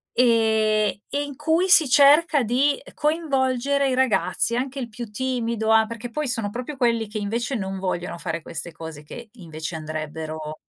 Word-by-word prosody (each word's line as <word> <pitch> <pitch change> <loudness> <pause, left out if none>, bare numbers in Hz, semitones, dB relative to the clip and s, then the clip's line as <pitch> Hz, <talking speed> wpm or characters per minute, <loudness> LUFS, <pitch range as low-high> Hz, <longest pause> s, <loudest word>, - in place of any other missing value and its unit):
ehm, 220 -3 +3
e 285 +1 -1
in 285 -2 -7
cui 320 +5 +1
si 320 -6 +7
cerca 290 +1 +5
di 265 +5 +1
coinvolgere 280 -3 0
i 255 - 0
ragazzi, 250 -2 +1
anche 265 +2 -3
il 240 - -4
più 235 +2 -7
timido 230 -2 -1
a 220 0 +5
perché 230 +1 -7
poi 300 +1 -2
sono 225 -4 -1
proprio 255 +5 -6
quelli 230 -3 +1
che 215 +1 -6
invece 230 +6 -2
non 190 -2 -4
vogliono 180 -2 -3
fare 165 -2 -4
queste 170 +1 -6
cose 160 -2 -9
che, 230 +8 -10
invece, 160 -6 -7
andrebbero 155 0 -6
235 Hz, 170 wpm, -23 LUFS, 195-270 Hz, -, si